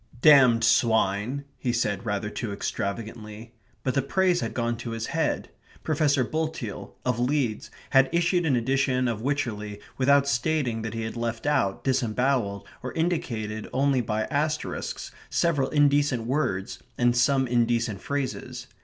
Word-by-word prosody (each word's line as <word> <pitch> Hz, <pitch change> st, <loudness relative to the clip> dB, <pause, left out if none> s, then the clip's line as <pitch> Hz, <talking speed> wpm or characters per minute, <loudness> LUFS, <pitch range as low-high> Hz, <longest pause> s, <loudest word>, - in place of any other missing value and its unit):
"Damned 130 Hz, -6 st, +7 dB
swine!" 110 Hz, +4 st, +2 dB
he 125 Hz, -, 0 dB
said, 110 Hz, -3 st, -1 dB
rather 105 Hz, 0 st, -2 dB
too 115 Hz, -4 st, -4 dB
extravagantly; 110 Hz, +2 st, -5 dB, 0.3 s
but 130 Hz, -, 0 dB
the 140 Hz, -, +2 dB
praise 180 Hz, +6 st, +1 dB
had -, -, -4 dB
gone 120 Hz, -1 st, 0 dB
to 115 Hz, 0 st, -5 dB
his 115 Hz, -, -3 dB
head. 160 Hz, +1 st, -1 dB, 0.3 s
Professor 145 Hz, -3 st, +2 dB
Bulteel, 155 Hz, -7 st, -4 dB
of 125 Hz, -2 st, 0 dB
Leeds, 125 Hz, -3 st, 0 dB, 0.2 s
had 135 Hz, -1 st, +5 dB
issued 175 Hz, +1 st, +2 dB
an 135 Hz, -, +3 dB
edition 130 Hz, +1 st, +1 dB
of 115 Hz, -2 st, -2 dB
Wycherley 110 Hz, -7 st, -2 dB, 0.2 s
without 140 Hz, +1 st, +4 dB
stating 125 Hz, -3 st, 0 dB
that 110 Hz, 0 st, -5 dB
he 115 Hz, -, -3 dB
had 110 Hz, -, -5 dB
left 115 Hz, 0 st, -3 dB
out, 100 Hz, -10 st, +1 dB
disembowelled, 125 Hz, -5 st, 0 dB, 0.2 s
or 125 Hz, -, -5 dB
indicated 115 Hz, -11 st, -2 dB
only 135 Hz, -1 st, +2 dB
by 110 Hz, -1 st, -1 dB
asterisks, 155 Hz, +3 st, -2 dB, 0.2 s
several 145 Hz, -6 st, +1 dB
indecent 145 Hz, -4 st, +3 dB
words 115 Hz, -8 st, -1 dB, 0.2 s
and 120 Hz, 0 st, +3 dB
some 130 Hz, +2 st, +3 dB
indecent 115 Hz, -4 st, 0 dB
phrases. 140 Hz, -2 st, -4 dB
125 Hz, 145 wpm, -26 LUFS, 110-140 Hz, 0.3 s, Damned